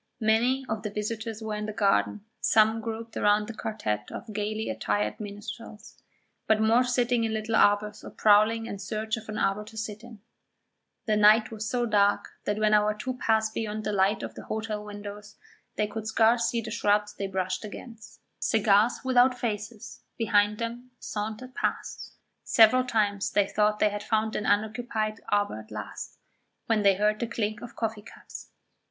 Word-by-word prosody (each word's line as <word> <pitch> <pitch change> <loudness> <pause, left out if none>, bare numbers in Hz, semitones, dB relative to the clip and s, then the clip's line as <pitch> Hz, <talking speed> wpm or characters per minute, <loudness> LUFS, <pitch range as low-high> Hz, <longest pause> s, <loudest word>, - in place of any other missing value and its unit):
Many 240 +4 +2
of 220 -2 -3
the 210 - -3
visitors 220 +1 -4
were 220 -1 -3
in 210 0 -3
the 215 - -4
garden, 195 - +1
some 220 +1 +3
grouped 225 0 -6
round 210 0 +2
a - - -10
quartet 105 - -3
of 220 - -8
gaily 215 +1 -2
attired 105 -1 -1
minstrels, 210 +1 -9 0.5
but 220 -1 +4
more 225 +3 +4
sitting 245 -1 +1
in 220 -1 -1
little 220 +1 -1
arbours 210 0 +3
or - - -8
prowling 215 +2 +4
in 200 - -6
search 215 +3 -2
of 220 -1 -10
an 215 - -4
arbour 195 +2 0
to 220 +1 -12
sit 215 -1 -5
in; 235 -3 -12 0.9
the 215 -3 +2
night 215 +2 +5
was 220 0 -4
so 245 -1 0
dark 205 -2 +2 0.2
that 205 - 0
when 215 0 +2
our 210 0 +3
two 255 +5 -4
passed 220 -1 +1
beyond 215 -1 -3
the 210 - -1
light 200 +1 +2
of - - -5
the - - -10
hotel 215 -1 -3
windows 205 0 -9 0.4
they 210 - +1
could 215 +1 -6
scarce 230 +2 +3
see 235 0 -1
the 220 -1 -7
shrubs 210 -2 +1
they 200 - -4
brushed 185 0 -2
against; 220 +1 -10 0.2
cigars 215 +1 +3
without 250 0 +4
faces 215 -2 -5 0.2
behind 210 -2 +2
them 235 +2 -5
sauntered 220 +5 -5
past; - - -3 0.3
several 230 +3 +5
times 210 -5 0
they 205 - +2
thought 210 +1 +1
they 210 - +3
had 205 0 -5
found 220 0 0
an 210 - -2
unoccupied 215 0 -1
arbour 205 - +1
at 110 - -13
last, 105 -1 -7 0.5
when 225 -2 +2
they 200 -1 +5
heard 210 +2 +1
the 235 - -1
clink 215 -2 -3
of 240 - -9
coffee 220 -2 -3
cups. 210 - -12
215 Hz, 180 wpm, -27 LUFS, 205-225 Hz, 0.9 s, night